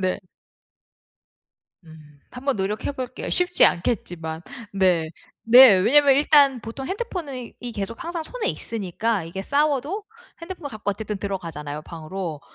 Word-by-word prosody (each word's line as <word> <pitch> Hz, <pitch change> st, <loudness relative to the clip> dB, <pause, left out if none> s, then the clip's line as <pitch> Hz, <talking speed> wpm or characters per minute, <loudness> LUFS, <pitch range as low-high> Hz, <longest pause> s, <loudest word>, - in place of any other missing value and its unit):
네. 185 Hz, -1 st, 0 dB, 1.7 s
음 155 Hz, -2 st, -16 dB
한번 265 Hz, 0 st, -2 dB
노력해 205 Hz, +8 st, -2 dB
볼게요. 255 Hz, -2 st, -6 dB
쉽지 360 Hz, 0 st, +4 dB
않겠지만. 170 Hz, -4 st, -1 dB, 0.3 s
네. 185 Hz, -4 st, +2 dB, 0.4 s
네. 245 Hz, -3 st, +10 dB
왜냐하면 275 Hz, +9 st, +5 dB
일단 280 Hz, -3 st, +4 dB
보통 230 Hz, +4 st, -7 dB
핸드폰이 350 Hz, -, -5 dB
이 245 Hz, -1 st, -5 dB
계속 220 Hz, -, -5 dB
항상 340 Hz, -1 st, -4 dB
손에 485 Hz, +2 st, -4 dB
있으니까 215 Hz, 0 st, -2 dB
이게 170 Hz, +4 st, -6 dB
싸워도 295 Hz, -, 0 dB, 0.4 s
핸드폰을 350 Hz, -4 st, -7 dB
갖고 210 Hz, -1 st, -3 dB
어쨌든 210 Hz, 0 st, -5 dB
들어가잖아요, 165 Hz, -7 st, -5 dB
방으로. 165 Hz, 0 st, -6 dB
225 Hz, 305 characters per minute, -23 LUFS, 180-280 Hz, 1.7 s, 네